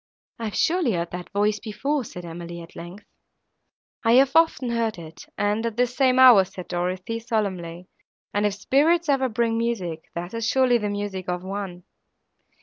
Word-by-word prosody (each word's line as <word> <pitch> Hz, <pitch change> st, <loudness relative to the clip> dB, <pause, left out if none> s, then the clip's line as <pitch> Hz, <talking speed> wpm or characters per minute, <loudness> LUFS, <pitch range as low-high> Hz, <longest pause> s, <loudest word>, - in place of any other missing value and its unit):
"I 230 Hz, -, -4 dB
have 210 Hz, -, -4 dB
surely 330 Hz, -, +2 dB
heard 170 Hz, -1 st, -2 dB
that 180 Hz, 0 st, -7 dB
voice 210 Hz, +1 st, +1 dB
before!" 265 Hz, +6 st, -2 dB
said 180 Hz, -5 st, -9 dB
Emily, 170 Hz, +1 st, -7 dB
at 165 Hz, 0 st, -12 dB
length. 175 Hz, +5 st, -10 dB, 1.0 s
"I 230 Hz, 0 st, +4 dB
have 260 Hz, +1 st, +5 dB
often 325 Hz, -6 st, +3 dB
heard 230 Hz, -3 st, -1 dB
it, 160 Hz, -1 st, -11 dB
and 210 Hz, +2 st, 0 dB
at 230 Hz, -1 st, -3 dB
this 250 Hz, 0 st, +1 dB
same 260 Hz, -2 st, +3 dB
hour," 250 Hz, -6 st, +8 dB
said 180 Hz, -1 st, -10 dB
Dorothée, 185 Hz, +6 st, -3 dB
solemnly, 185 Hz, -7 st, -3 dB, 0.5 s
"and, 205 Hz, +1 st, +2 dB
if 205 Hz, -, -3 dB
spirits 320 Hz, +9 st, +2 dB
ever 265 Hz, -2 st, +2 dB
bring 230 Hz, 0 st, 0 dB
music—that 175 Hz, -5 st, -4 dB
is 230 Hz, -1 st, -2 dB
surely 255 Hz, -1 st, +3 dB
the 210 Hz, -1 st, -2 dB
music 205 Hz, -3 st, -4 dB
of 180 Hz, 0 st, -2 dB
one!" 190 Hz, -2 st, -5 dB
210 Hz, 170 wpm, -24 LUFS, 180-245 Hz, 1.0 s, hour